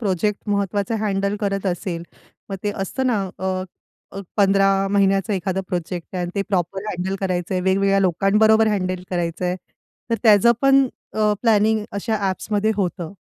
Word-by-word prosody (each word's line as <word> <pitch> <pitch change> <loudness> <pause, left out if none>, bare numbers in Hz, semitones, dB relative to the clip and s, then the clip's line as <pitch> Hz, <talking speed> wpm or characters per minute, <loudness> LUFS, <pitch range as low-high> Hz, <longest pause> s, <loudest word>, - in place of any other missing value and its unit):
Project 205 +1 -1
महत्वाचा 200 +1 0
handle 200 -1 0
करत 195 -1 -2
असेल. 175 -1 -3 0.5
मग 195 - -4
ते 205 - 0
असतं 260 +7 -2
ना, 245 -3 +2 0.2
अ, 190 - -6 0.7
अ, 195 - -4 0.2
15 195 -1 +4 0.2
महिन्याचा 195 +1 +2
एखादा 190 0 -2
प्रोजेक्ट 175 -1 -4
आहे 180 - -1
आणि 175 - -3
ते 200 - 0
प्रॉपर 190 +1 -1
हँडल 190 0 -3
करायचंय, 185 -1 -1
वेगवेगळ्या 195 +1 +2
लोकांबरोबर 210 +4 +3
हँडल 185 -3 -1
करायचंय. 175 +1 -2 0.5
तर - - +3
त्याचं 220 +1 +6
पण 275 0 +5 0.3
अ, 215 -1 +2
प्लॅनिंग 220 -1 +3
अशा 215 +2 -1
ॲप्समध्ये 210 +3 -1
होतं. 180 -3 -2
195 Hz, 150 wpm, -21 LUFS, 185-210 Hz, 0.7 s, त्याचं